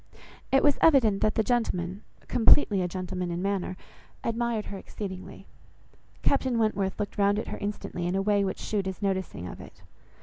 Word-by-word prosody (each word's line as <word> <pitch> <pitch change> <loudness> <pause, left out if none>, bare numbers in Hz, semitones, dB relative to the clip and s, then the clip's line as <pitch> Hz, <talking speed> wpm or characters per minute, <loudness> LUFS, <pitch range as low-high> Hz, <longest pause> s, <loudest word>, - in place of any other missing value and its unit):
It 270 - +4
was 290 -1 +4
evident 240 -11 +5
that 215 - +2
the 220 - +2
gentleman, 200 -6 -1 0.3
(completely 225 -4 +5
a 180 - 0
gentleman 180 0 -4
in 170 0 -3
manner) 190 -1 -2 0.5
admired 230 -1 -1
her 200 - -6
exceedingly. 190 -1 -8 0.8
Captain 260 -3 +2
Wentworth 205 -4 0
looked 205 0 -4
round 200 0 +3
at 220 - -3
her - - -4
instantly 200 -4 -4
in 180 - -1
a 195 - +2
way 205 0 +3
which 190 - -2
shewed 200 -3 -2
his 190 +2 -5
noticing 190 - -2
of - - -8
it. - - -14
200 Hz, 175 wpm, -27 LUFS, 185-220 Hz, 0.8 s, evident